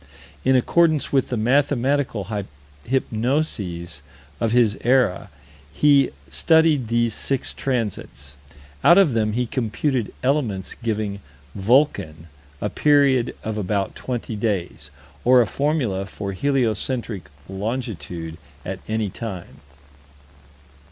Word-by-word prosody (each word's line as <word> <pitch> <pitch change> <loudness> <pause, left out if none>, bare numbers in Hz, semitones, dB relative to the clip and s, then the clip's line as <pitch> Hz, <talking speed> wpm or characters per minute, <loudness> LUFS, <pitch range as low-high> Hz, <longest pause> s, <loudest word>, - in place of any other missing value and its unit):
In 130 0 +4
accordance 155 +4 +3
with 135 -2 +3
the 125 - -2
mathematical 130 -1 +1 0.6
hypnoses 110 - -1 0.4
of 115 - 0
his 115 -4 +4
era, 125 -7 +2 0.4
he 140 -3 +4 0.2
studied 160 - +3
these 115 0 +1
six 135 +3 -2
transits. 100 - -3 0.5
Out 170 - +7
of 185 -10 +5
them 110 -2 +1
he 125 +2 0
computed 120 +1 -1
elements 125 -9 0
giving 110 -3 -3 0.3
"Vulcan" 100 - +1 0.4
a 105 - -1
period 140 -4 +3
of 110 -1 -3
about 100 0 -1
20 120 -3 -4
days, 100 -5 -2 0.3
or 125 +1 +6
a 120 - +5
formula 125 -7 -1
for 100 0 -5
heliocentric 120 -2 -1 0.2
longitude 95 - -5 0.3
at 95 0 -4
any 110 -2 -1
time. 95 -6 -7
115 Hz, 105 wpm, -22 LUFS, 100-135 Hz, 0.6 s, Out